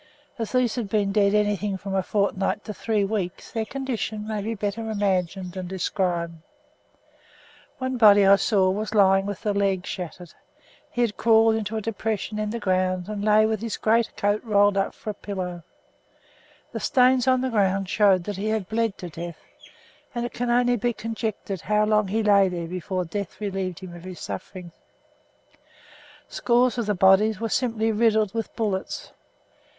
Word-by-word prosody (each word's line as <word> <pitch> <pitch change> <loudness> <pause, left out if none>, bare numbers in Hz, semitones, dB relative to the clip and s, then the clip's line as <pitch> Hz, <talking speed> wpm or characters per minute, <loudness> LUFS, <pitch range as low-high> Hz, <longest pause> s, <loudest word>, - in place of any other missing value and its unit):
As 225 - -3
these 250 -3 +2
had 235 -5 -3
been 205 -1 +1
dead 200 0 +3
anything 205 -1 0
from 195 +1 -6
a 190 - +2
fortnight 200 +1 -1
to 215 - -5
three 215 0 0
weeks 195 -3 -3
their 225 -2 -2
condition 230 -5 -4
may 215 -1 -2
be 225 +3 -3
better 210 +2 -3
imagined 190 -3 -1
than 185 0 -6
described. 175 -3 -2 1.4
One 260 -1 -2
body 205 -3 +7
I 200 +1 +7
saw 190 -2 +2
was 215 +3 -3
lying 195 -1 +4
with 205 -2 -5
the 210 - 0
leg 195 -2 0
shattered. 180 -1 -7 0.6
He 245 - -2
had 230 -3 0
crawled 225 -1 +4
into 220 0 -2
a - - -2
depression 215 0 -3
in 215 0 -1
the 235 - -3
ground 185 -1 0
and 210 -1 -4
lay 215 0 +5
with 220 -1 -1
his 230 -1 -3
great 225 +1 +1
coat 205 +1 0
rolled 205 -3 +3
up 195 0 -1
for 215 - -5
a - - -8
pillow; 185 -4 -5 1.1
the - - -4
stains 255 0 +3
on 255 -1 +4
the 260 0 -1
ground 195 -3 +1
showed 195 -2 +3
that 205 +1 -5
he 205 +2 -3
had 215 -4 -1
bled 225 -1 -1
to 180 - -7
death, 170 0 -7 0.8
and 240 0 -1
it 240 - -6
can 245 0 -2
only 245 0 +3
be 240 +2 0
conjectured 220 -5 -4
how 210 0 +2
long 210 -1 +2
he 220 +3 0
lay 200 -2 +5
there 170 -2 -4
before 185 +1 -3
death 200 +2 -5
relieved 190 -4 -3
him 185 -2 -9
of 175 +1 -11
his 185 -1 -8
sufferings. 180 -3 -7 1.6
Scores 245 0 +1
of 230 - -2
the 210 - +1
bodies 195 +3 +4
were 225 - -1
simply 225 -3 0
riddled 215 -2 +2
with 225 -1 -3
bullets. 200 -4 -3
205 Hz, 180 wpm, -24 LUFS, 190-220 Hz, 1.6 s, body